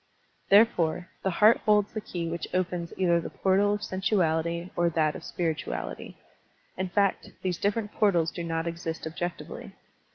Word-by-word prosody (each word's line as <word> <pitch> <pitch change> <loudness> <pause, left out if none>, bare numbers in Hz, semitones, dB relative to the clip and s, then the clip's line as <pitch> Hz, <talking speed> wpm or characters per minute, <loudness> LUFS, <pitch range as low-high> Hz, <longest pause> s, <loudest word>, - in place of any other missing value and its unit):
Therefore, 185 -5 +4
the 190 - 0
heart 210 +5 +5
holds 210 -1 +2
the 215 - -3
key 175 -5 -4
which 170 +1 -4
opens 180 -2 -1
either 170 -2 +3
the - - -6
portal 195 +2 +2
of 210 - -6
sensuality 170 -3 0
or 175 0 +2
that 155 -2 +1
of - - -8
spir 165 -2 -1
ituality. - - -6 0.6
In 185 0 -3
fact, 200 +1 +1
these 185 -2 -1
different 210 +1 -1
portals 175 -6 +2
do 170 - -5
not 165 0 -2
exist 165 -1 -4
objectively. 175 +2 -5
175 Hz, 160 wpm, -27 LUFS, 170-200 Hz, 0.6 s, heart